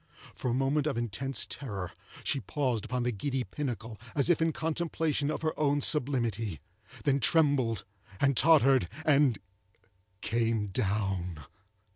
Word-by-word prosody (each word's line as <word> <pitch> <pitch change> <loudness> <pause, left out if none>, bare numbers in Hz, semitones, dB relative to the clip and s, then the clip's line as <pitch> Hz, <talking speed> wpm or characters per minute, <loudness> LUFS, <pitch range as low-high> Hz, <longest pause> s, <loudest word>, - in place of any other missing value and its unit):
For 125 - -3
a - - +1
moment 135 +3 +1
of 140 - -1
intense 120 +3 -2
terror 100 -10 -5 0.3
she 140 - +1
paused 130 -7 -1
upon 125 -1 -2
the 125 - +1
giddy 130 +4 -2
pinnacle, 115 -7 -5 0.2
as 145 +4 +3
if 165 - +2
in 165 0 +3
contemplation 160 -2 -1
of 155 - -3
her 155 - +1
own 145 -1 +2
sublimity, 115 - 0 0.4
then 140 -1 +2
trembled 140 -8 +3 0.3
and 140 -1 +3
tottered, 135 - +5 0.2
and—came 105 -3 -1
down. 95 -4 -1
125 Hz, 130 wpm, -30 LUFS, 105-145 Hz, 0.4 s, tottered